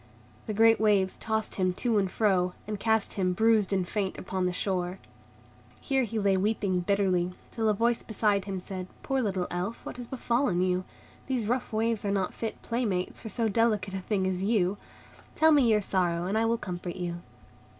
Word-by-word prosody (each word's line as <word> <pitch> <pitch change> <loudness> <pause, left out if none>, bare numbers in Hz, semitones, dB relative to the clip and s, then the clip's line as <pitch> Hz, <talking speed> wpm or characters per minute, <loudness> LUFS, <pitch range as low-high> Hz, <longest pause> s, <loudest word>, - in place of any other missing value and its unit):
The 215 - -2
great 225 +1 +5
waves 200 -3 +3
tossed 220 -1 -2
him 185 0 +2
to 225 +2 +1
and 195 -2 0
fro, 185 -3 +1
and 210 -1 -4
cast 220 -1 +1
him 185 -2 0
bruised 220 0 +3
and 190 -2 0
faint 195 -1 -2
upon 185 -1 -2
the - - 0
shore. 180 -1 -2 0.8
Here 270 -3 +1
he 225 0 -4
lay 200 -2 +3
weeping 195 -2 +1
bitterly, 180 -1 +1 0.2
till 225 -2 0
a 210 - +2
voice 235 +2 +1
beside 210 -3 0
him 195 -2 -3
said, 185 0 -6 0.2
"Poor 270 -1 0
little 190 -5 -1
Elf, 180 +6 -4
what - - -6
has 245 -1 -7
befallen 235 -7 0
you? 185 0 0 0.4
These 250 -6 -1
rough 245 +2 -1
waves 225 0 0
are 205 - -1
not 195 -2 0
fit 225 -1 -5
playmates 215 -7 -1
for 220 - -7
so 225 +2 0
delicate 210 -3 +1
a 195 - -2
thing 190 0 -1
as 185 -1 -1
you. 200 -2 +1 0.6
Tell 315 0 +5
me 275 -6 +5
your 210 -1 +4
sorrow, 175 -3 0
and 195 +3 -1
I 225 +1 +2
will 230 +1 +2
comfort 175 -3 -5
you." 175 -2 -3
200 Hz, 195 wpm, -28 LUFS, 185-225 Hz, 0.8 s, great